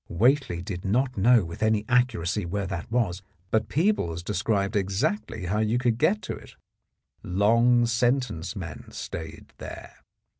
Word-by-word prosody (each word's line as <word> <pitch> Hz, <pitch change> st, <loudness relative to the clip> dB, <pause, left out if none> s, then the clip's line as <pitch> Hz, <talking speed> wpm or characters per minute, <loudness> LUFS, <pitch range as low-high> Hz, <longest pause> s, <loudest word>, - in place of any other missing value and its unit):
Whately 115 Hz, -3 st, +2 dB
did 90 Hz, -1 st, -5 dB
not 125 Hz, +6 st, +1 dB
know 110 Hz, 0 st, +5 dB
with 85 Hz, 0 st, -8 dB
any 110 Hz, -1 st, +2 dB
accuracy 115 Hz, -6 st, +1 dB
where 100 Hz, +3 st, -2 dB
that 95 Hz, +1 st, -5 dB
was, 105 Hz, -7 st, 0 dB, 0.3 s
but 110 Hz, 0 st, +1 dB
Peebles 145 Hz, -, 0 dB
described 100 Hz, +2 st, 0 dB
exactly 105 Hz, -, -1 dB
how 100 Hz, +5 st, 0 dB
you 110 Hz, +2 st, +1 dB
could 120 Hz, -2 st, +1 dB
get 210 Hz, +7 st, +2 dB
to -, -, -4 dB
it. -, -, -14 dB, 0.7 s
Long 115 Hz, +6 st, +3 dB
sentence 120 Hz, -6 st, 0 dB
men 85 Hz, -8 st, -7 dB
stayed 80 Hz, -1 st, -7 dB
there. -, -, -9 dB
105 Hz, 145 wpm, -26 LUFS, 90-125 Hz, 0.7 s, know